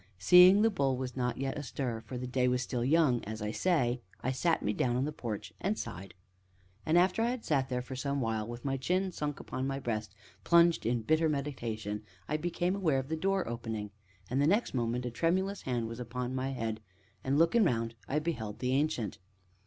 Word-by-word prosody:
Seeing 180 Hz, -, +8 dB
"The 225 Hz, -, +4 dB
Bull" 135 Hz, -9 st, +1 dB
was 130 Hz, -1 st, -4 dB
not 125 Hz, -1 st, -1 dB
yet 135 Hz, 0 st, -2 dB
astir, 130 Hz, -5 st, -3 dB
for 120 Hz, +3 st, -7 dB
the 125 Hz, -, -4 dB
day 125 Hz, 0 st, +1 dB
was 125 Hz, 0 st, +1 dB
still 120 Hz, -1 st, -2 dB
young 140 Hz, -3 st, +3 dB
(as 110 Hz, +1 st, -5 dB
I 105 Hz, 0 st, -2 dB
say), 125 Hz, -5 st, +1 dB, 0.2 s
I 130 Hz, -, +1 dB
sat 165 Hz, +6 st, +1 dB
me 105 Hz, -, +1 dB
down 120 Hz, +1 st, +1 dB
in 130 Hz, -, +1 dB
the 150 Hz, -, -2 dB
porch 115 Hz, -8 st, -5 dB
and 205 Hz, +3 st, 0 dB
sighed. 95 Hz, +1 st, -7 dB, 0.7 s
And 160 Hz, +2 st, +4 dB
after 185 Hz, +5 st, +3 dB
I 230 Hz, -, +2 dB
had 245 Hz, -2 st, -4 dB
sat 135 Hz, -3 st, +1 dB
there 125 Hz, -1 st, -2 dB
for 130 Hz, +1 st, -7 dB
some 140 Hz, +2 st, -1 dB
while, 110 Hz, -3 st, -1 dB
with 120 Hz, +2 st, -8 dB
my 135 Hz, -1 st, 0 dB
chin 185 Hz, +7 st, 0 dB
sunk 150 Hz, -4 st, -3 dB
upon 130 Hz, +1 st, -4 dB
my 135 Hz, 0 st, -2 dB
breast, 110 Hz, -5 st, -3 dB, 0.3 s
and -, -, -33 dB
plunged 170 Hz, -6 st, +4 dB
in 120 Hz, -1 st, 0 dB
bitter 155 Hz, +5 st, +3 dB
meditation, 115 Hz, -8 st, -3 dB, 0.3 s
I 150 Hz, -, 0 dB
became 175 Hz, +3 st, -1 dB
aware 165 Hz, -8 st, +1 dB
of 135 Hz, +1 st, -3 dB
the 160 Hz, -, 0 dB
door 195 Hz, +3 st, 0 dB
opening, 110 Hz, -3 st, -4 dB, 0.4 s
and 130 Hz, -, -1 dB
next 185 Hz, +11 st, +2 dB
moment 120 Hz, 0 st, -1 dB
a 125 Hz, -, -3 dB
tremulous 190 Hz, +8 st, 0 dB
hand 120 Hz, -3 st, -2 dB
was 115 Hz, +1 st, -7 dB
laid 125 Hz, -, -5 dB
upon 125 Hz, +1 st, -3 dB
my 130 Hz, +1 st, -1 dB
head, 115 Hz, -4 st, -3 dB, 0.4 s
and, 135 Hz, +2 st, +1 dB
looking 170 Hz, +8 st, +4 dB
round, 115 Hz, -, 0 dB
I 145 Hz, -, 0 dB
beheld 120 Hz, -10 st, -3 dB
the 125 Hz, +2 st, -1 dB
Ancient. 135 Hz, -, 0 dB
130 Hz, 215 wpm, -31 LUFS, 120-160 Hz, 0.7 s, Seeing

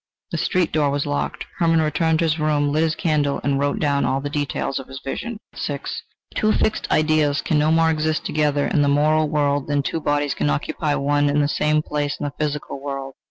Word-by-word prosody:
The -, -, -2 dB
street 180 Hz, -3 st, +1 dB
door 150 Hz, -2 st, +2 dB
was 140 Hz, 0 st, -1 dB
locked. 70 Hz, 0 st, -2 dB
Hermann 165 Hz, -1 st, +3 dB
returned 160 Hz, +1 st, +1 dB
to 165 Hz, -, +1 dB
his 160 Hz, 0 st, 0 dB
room, 150 Hz, -1 st, +1 dB
lit 155 Hz, +2 st, +1 dB
his 160 Hz, -1 st, +1 dB
candle, 150 Hz, -4 st, 0 dB
and 140 Hz, -1 st, +1 dB
wrote 145 Hz, 0 st, 0 dB
down 140 Hz, -2 st, +1 dB
all 135 Hz, -, +1 dB
the 145 Hz, +1 st, -5 dB
details 145 Hz, -2 st, -2 dB
of 135 Hz, -, -9 dB
his 135 Hz, 0 st, -8 dB
vision. 235 Hz, -, -4 dB, 0.2 s
VI -, -, -3 dB, 0.5 s
Two 215 Hz, -, +2 dB
fixed 220 Hz, -, 0 dB
ideas 155 Hz, -2 st, +2 dB
can 155 Hz, -, +1 dB
no 150 Hz, +1 st, +3 dB
more 165 Hz, 0 st, +4 dB
exist 155 Hz, 0 st, -1 dB
together 150 Hz, -1 st, +1 dB
in 150 Hz, -, +1 dB
the 145 Hz, -, +3 dB
moral 155 Hz, +2 st, +3 dB
world 145 Hz, -2 st, +1 dB
than 145 Hz, -1 st, +1 dB
two 160 Hz, -, -2 dB
bodies 145 Hz, -1 st, 0 dB
can 75 Hz, -, -1 dB
occupy 145 Hz, -, -1 dB
one 145 Hz, +1 st, +2 dB
and 145 Hz, +1 st, +2 dB
the -, -, +2 dB
same 150 Hz, +1 st, +1 dB
place 145 Hz, -1 st, -2 dB
in -, -, -4 dB
the 145 Hz, -1 st, -3 dB
physical 150 Hz, -2 st, -3 dB
world. 135 Hz, -1 st, -5 dB
145 Hz, 220 wpm, -22 LUFS, 145-155 Hz, 0.5 s, more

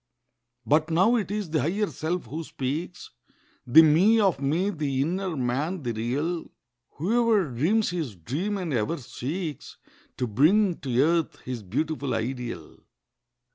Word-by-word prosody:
But 155 Hz, +7 st, +2 dB
now 190 Hz, +9 st, +4 dB
it 210 Hz, -7 st, -1 dB
is 205 Hz, -5 st, -3 dB
the 155 Hz, -, +1 dB
Higher 195 Hz, +8 st, 0 dB
Self 175 Hz, -3 st, -3 dB
who 155 Hz, +8 st, -5 dB
speaks— 155 Hz, +6 st, -5 dB, 0.6 s
The 160 Hz, +7 st, +8 dB
Me 180 Hz, +9 st, +5 dB
of 190 Hz, -9 st, +2 dB
me—the 150 Hz, -2 st, 0 dB
inner 180 Hz, +1 st, -2 dB
Man—the 135 Hz, +2 st, -1 dB
real— 140 Hz, +10 st, -2 dB, 0.4 s
Whoever 215 Hz, -, +2 dB
dreams 170 Hz, -, +1 dB
his 160 Hz, -, -3 dB
dream 150 Hz, -, -3 dB
and 175 Hz, -6 st, -3 dB
ever 120 Hz, +8 st, 0 dB
seeks 145 Hz, +4 st, -6 dB, 0.4 s
To 125 Hz, -, 0 dB
bring 165 Hz, -, +3 dB
to 130 Hz, -6 st, -1 dB
earth 165 Hz, +1 st, 0 dB
his 125 Hz, -2 st, -5 dB
beautiful 140 Hz, -, -2 dB
ideal. 120 Hz, -, -5 dB
155 Hz, 135 wpm, -26 LUFS, 130-185 Hz, 0.6 s, The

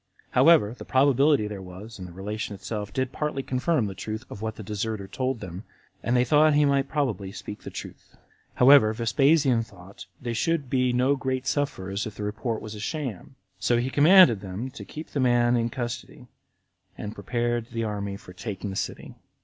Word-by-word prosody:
However, 130 Hz, -5 st, +5 dB
the -, -, -9 dB
probability 140 Hz, -1 st, +3 dB
there 105 Hz, -2 st, -6 dB
was 95 Hz, +4 st, -10 dB
in 90 Hz, -, -6 dB
the -, -, -11 dB
relation 105 Hz, +3 st, -5 dB
itself 105 Hz, 0 st, -5 dB
did 130 Hz, +3 st, -1 dB
partly 150 Hz, -3 st, -2 dB
confirm 130 Hz, 0 st, 0 dB
the 100 Hz, -, -4 dB
truth 110 Hz, +5 st, -6 dB
of 100 Hz, -, -8 dB
what 110 Hz, 0 st, -3 dB
the 110 Hz, -, -8 dB
deserter 105 Hz, 0 st, -3 dB
told 130 Hz, +2 st, -2 dB
them, 95 Hz, 0 st, -7 dB, 0.4 s
and 120 Hz, -, 0 dB
they 125 Hz, -, +3 dB
thought 150 Hz, +3 st, +5 dB
he 150 Hz, 0 st, +5 dB
might 140 Hz, -1 st, +1 dB
probably 110 Hz, -, -1 dB
speak 105 Hz, +1 st, -8 dB
truth. -, -, -10 dB, 0.4 s
However, 125 Hz, -4 st, +7 dB
Vespasian 135 Hz, +3 st, +3 dB
thought 100 Hz, -3 st, -12 dB
they 120 Hz, -1 st, -3 dB
should 145 Hz, +2 st, -1 dB
be 125 Hz, -1 st, +2 dB
no 125 Hz, +3 st, +2 dB
great 130 Hz, -1 st, -2 dB
sufferers 105 Hz, -9 st, -2 dB
if 105 Hz, -, -9 dB
the 105 Hz, -, -6 dB
report 110 Hz, +2 st, -3 dB
was 110 Hz, -, -7 dB
a 105 Hz, -, -8 dB
sham; 130 Hz, -, -5 dB, 0.2 s
so 120 Hz, -, +2 dB
he 125 Hz, +2 st, -1 dB
commanded 150 Hz, -, +7 dB
them 100 Hz, +7 st, -5 dB
to 140 Hz, -, -9 dB
keep 155 Hz, +1 st, -9 dB
the 145 Hz, -, -2 dB
man 120 Hz, -1 st, +3 dB
in 115 Hz, -1 st, +1 dB
custody, 120 Hz, -1 st, -6 dB, 0.7 s
and 105 Hz, -, -5 dB
prepared 120 Hz, -1 st, -2 dB
the 115 Hz, -2 st, -3 dB
army 100 Hz, -2 st, -3 dB
for 90 Hz, -, -13 dB
taking 100 Hz, +1 st, -5 dB
the -, -, -6 dB
city. -, -, -4 dB
120 Hz, 190 wpm, -26 LUFS, 105-135 Hz, 0.7 s, However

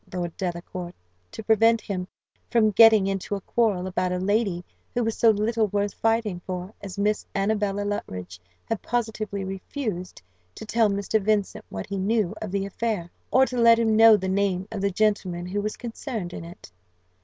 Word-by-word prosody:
Lord 175 Hz, -2 st, -4 dB
Delacour, 175 Hz, 0 st, -5 dB, 0.4 s
to 220 Hz, -, -8 dB
prevent 225 Hz, +1 st, +4 dB
him 185 Hz, -3 st, -4 dB, 0.4 s
from 220 Hz, -2 st, +3 dB
getting 220 Hz, -1 st, +7 dB
into 195 Hz, +1 st, -2 dB
a 195 Hz, -, -5 dB
quarrel 205 Hz, -4 st, +1 dB
about 185 Hz, -1 st, -1 dB
a 180 Hz, -, 0 dB
lady 190 Hz, -2 st, 0 dB, 0.3 s
who 240 Hz, -, +1 dB
was 225 Hz, 0 st, -1 dB
so 230 Hz, -, +4 dB
little 220 Hz, +1 st, +2 dB
worth 205 Hz, 0 st, -1 dB
fighting 225 Hz, -5 st, 0 dB
for 185 Hz, +2 st, -5 dB
as 200 Hz, -1 st, -8 dB
Miss 210 Hz, +1 st, +1 dB
Annabella 205 Hz, 0 st, 0 dB
Luttridge, 90 Hz, -, -5 dB, 0.3 s
had 225 Hz, -, -3 dB
positively 220 Hz, -4 st, -2 dB
refused 190 Hz, -, -5 dB, 0.3 s
to -, -, -8 dB
tell 220 Hz, 0 st, +2 dB
Mr. 200 Hz, +2 st, 0 dB
Vincent 205 Hz, -1 st, 0 dB
what 95 Hz, -1 st, -5 dB
he 195 Hz, -, -4 dB
knew 205 Hz, -1 st, +1 dB
of 215 Hz, -, -4 dB
the 195 Hz, +1 st, -1 dB
affair, 200 Hz, -3 st, -3 dB, 0.2 s
or 265 Hz, +1 st, +5 dB
to 250 Hz, 0 st, -5 dB
let 230 Hz, 0 st, +7 dB
him 225 Hz, -1 st, +2 dB
know 225 Hz, -1 st, +8 dB
the 190 Hz, -1 st, -4 dB
name 190 Hz, -1 st, 0 dB
of 210 Hz, -3 st, -4 dB
the 200 Hz, -, +2 dB
gentleman 190 Hz, -3 st, 0 dB
who 200 Hz, +3 st, -2 dB
was 215 Hz, +1 st, -3 dB
concerned 225 Hz, -6 st, -5 dB
in 165 Hz, -, -7 dB
it. 170 Hz, -, -12 dB
205 Hz, 180 wpm, -25 LUFS, 185-220 Hz, 0.4 s, know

